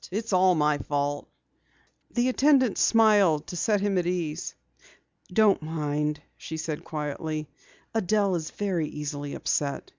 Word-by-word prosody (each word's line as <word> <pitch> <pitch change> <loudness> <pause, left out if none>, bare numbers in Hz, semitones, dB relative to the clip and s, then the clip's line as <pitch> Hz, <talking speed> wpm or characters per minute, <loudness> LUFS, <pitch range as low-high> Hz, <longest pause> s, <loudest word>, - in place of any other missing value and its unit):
It's 215 +2 -3
all 185 0 +5
my 150 -1 +2
fault." 145 0 -2 0.8
The 240 +1 0
attendant 260 -4 +3
smiled 205 -9 +4
to - - -7
set 205 +3 +1
him 200 -2 +1
at 175 - -2
ease. 170 -4 -3 0.8
"Don't 205 -1 +4
mind," 150 -1 -2 0.2
she 160 - -7
said 155 -1 -4
quietly. 155 0 -4 0.5
"Adelle 210 -2 +1
is 160 -2 -3
very 185 -6 -2
easily 145 -1 -5
upset. 140 -2 -2
165 Hz, 130 wpm, -26 LUFS, 150-205 Hz, 0.8 s, all